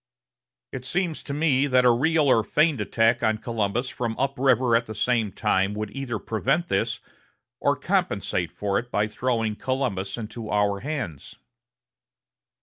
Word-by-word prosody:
It 130 - -6
seems 170 +4 -2
to - - -7
me 145 -2 +2
that 125 -2 +3
a 125 - +7
real 155 +6 +2
or 115 -5 +4
feigned 150 0 +2
attack 115 +3 +2
on 110 0 +2
Columbus 115 +2 -2
from 115 -3 -3
up 135 +1 0
river 130 -3 +3
at 115 0 +1
the 110 - -7
same 115 -4 +1
time 100 0 0
would 105 -1 -4
either 135 -5 -3
prevent 135 +12 -1
this, 95 - 0 0.6
or - - +2
compensate 85 -2 -1
for 100 -1 -1
it 120 - -8
by 105 -2 +1
throwing 115 -1 -1
Columbus 120 -7 -2
into 110 0 -6
our 105 -1 +1
hands." 135 - -5
120 Hz, 155 wpm, -25 LUFS, 105-135 Hz, 0.6 s, a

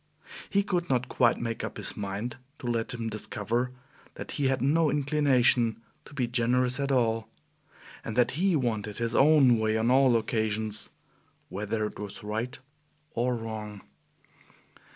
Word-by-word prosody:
He 200 0 +2
could 180 -3 -1
not 125 -1 +1
quite 120 -2 +2
make 115 -1 -3
up - - -5
his - - 0
mind 105 +5 -4 0.2
to - - -11
let 115 -2 -1
him 115 -2 -4
discover 110 +3 -2 0.4
that - - -7
he 140 -2 0
had 130 -1 +1
no 150 +5 +3
inclination 135 -6 +2 0.3
to 145 - -14
be 125 -4 0
generous 125 +2 +1
at 140 0 0
all, 115 -3 +1 0.8
and 110 - -5
that 125 -1 +3
he 180 +4 +1
wanted 110 -6 -1
his 115 -1 -1
own 135 -5 +5
way 110 0 +1
on 115 +2 +2
all 130 -2 +5
occasions, 110 -1 -1 0.6
whether 105 +2 -2
it 105 - -7
was 105 -1 -7
right 110 +4 -3 0.6
or 125 +1 0
wrong. 110 -3 -6
120 Hz, 150 wpm, -28 LUFS, 110-130 Hz, 0.8 s, own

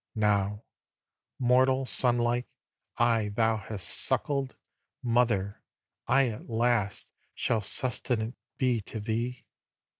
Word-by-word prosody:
Now, 105 -1 0 0.7
mortal 130 +1 +2
sonlike, 120 -1 +2 0.5
I 115 -3 +2
thou 115 0 +1
hast 100 -2 -2
suckled, 140 -2 +3 0.5
Mother, 115 -5 0 0.5
I 135 +1 +3
at 110 +1 -9
last 115 -4 -1 0.2
Shall 115 -2 -1
sustenant 115 +1 0 0.2
be 125 -4 0
to 110 - -6
thee. 115 +4 -4
120 Hz, 95 wpm, -28 LUFS, 110-125 Hz, 0.7 s, suckled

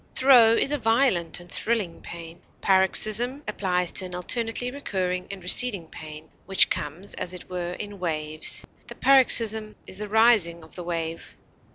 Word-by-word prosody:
Throe 245 -4 +6
is 270 - 0
a 295 - -1
violent 225 -8 +1
and 175 - -14
thrilling 215 -7 -2
pain. 170 0 -11 0.2
Paroxysm 215 +8 +1
applies 180 -2 0
to 190 - -2
an 180 -1 -8
alternately 230 +6 -2
recurring 185 -9 -4
and 195 -2 -9
receding 200 -1 +3
pain, 155 0 -11 0.2
which 195 0 +4
comes 155 +7 -4
as 180 0 -5
it 180 - -12
were 175 -1 -4
in 205 +1 -8
waves; 155 -3 -1 0.2
the - - -10
paroxysm 225 -5 +3
is 190 - -7
the 210 -1 -6
rising 210 -7 +3
of 160 - -16
the 180 - -8
wave. 165 -1 -6
190 Hz, 160 wpm, -24 LUFS, 170-225 Hz, 0.2 s, Throe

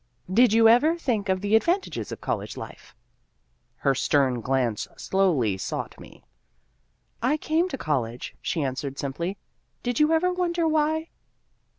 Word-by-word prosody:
" 180 - -9
Did 250 - +6
you 225 +1 +6
ever 295 +9 +5
think 225 - -1
of 185 0 +1
the 205 +2 +2
advantages 350 - 0
of - - -6
college - - -3
life? - - -10 0.4
". - - -45
Her 135 - +5
stern 130 -2 +1
glance 125 -4 0
slowly 145 - +1
sought - - -5
me. - - -14 0.5
" 110 - -44 0.2
I 260 +6 +2
came 320 +4 0
to 270 - -4
college," 125 - -3
she 160 - -1
answered 135 +1 -3
simply, 170 +8 -3 0.2
" - - -45
did 245 -1 -1
you 300 +1 +4
ever 360 +3 +2
wonder 345 -2 0
why 315 +1 +1
205 Hz, 165 wpm, -25 LUFS, -, 0.5 s, Did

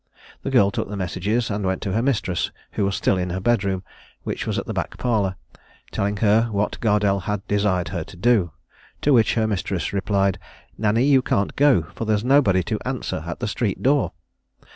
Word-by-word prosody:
The - - -3
girl 100 0 +4
took - - -3
the 105 - -5
messages, 100 +5 -1
and 100 0 -2
went 95 0 0
to 100 - -2
her 115 - +1
mistress, 115 -9 0 0.2
who - - -1
was 100 - 0
still 95 - +1
in 90 0 -2
her 90 +2 -2
bedroom, 100 -3 0 0.4
which - - -4
was - - -1
the - - -3
back - - -3
parlour, 105 -6 0 0.6
telling 100 +1 -1
her 110 +3 +4
what 105 -2 -2
Gardelle 105 -3 +1
had 105 -1 -3
desired 100 -4 +1
her 85 -3 -3
to 95 - -13
do; 105 -3 +3 0.5
to 145 - +3
which 115 -3 +4
her 110 -2 +2
mistress 95 -5 -2
replied, 100 -1 +1 0.4
"Nanny, 110 +2 +2
you 135 -1 +5
can't 100 -5 0
go, 140 - +4
for 115 - -4
there's 105 -1 +1
nobody 125 -9 +4
to - - -2
answer - - -3
at - - -5
the - - -1
street - - -2
door." 140 - +2
100 Hz, 195 wpm, -23 LUFS, 95-115 Hz, 0.6 s, you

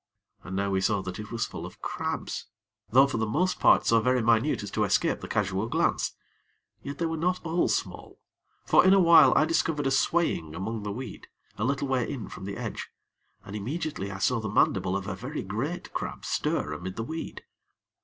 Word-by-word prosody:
And 90 - -6
now 100 0 0
we 95 -1 +1
saw 100 0 +1
that 95 +1 -6
it 105 -1 -7
was 115 - -1
full - - -7
of - - -9
crabs; - - -4 0.4
though 130 +4 +6
for 140 - -2
the 110 - 0
most 180 +11 0
part - - +5
so 115 - +4
very 125 +2 +2
minute 115 +3 +2
as 100 - -6
to 110 - 0
escape 100 -1 +1
the - - -6
casual 100 +1 -1
glance; - - 0 0.7
yet 140 +1 -6
they 170 - -1
were 165 0 -1
not 180 +2 -1
all 170 +2 +1
small, - - -3 0.5
for - - +5
in 190 +1 +6
a - - +5
while 170 -3 +7
I 155 - +5
discovered 160 -2 0
a 135 - +2
swaying 135 - +1
among 110 +3 -4
the 105 0 -4
weed, 120 0 -7 0.3
a 105 - -3
little 140 +3 0
way 130 -3 0
in 125 -6 -6
from 95 - -8
the 100 0 -5
edge, - - -5 0.6
and 100 - -8
immediately 130 - -3
I 95 - -6
saw 120 +5 +1
the 110 -1 -4
mandible 95 -1 +2
of 100 - -6
a 95 - -2
very 125 +11 -5
great 120 - -4
crab - - -5
stir 75 - -1
amid 90 +5 -6
the 115 - -3
weed. 160 +7 -6
115 Hz, 210 wpm, -27 LUFS, 100-150 Hz, 0.7 s, while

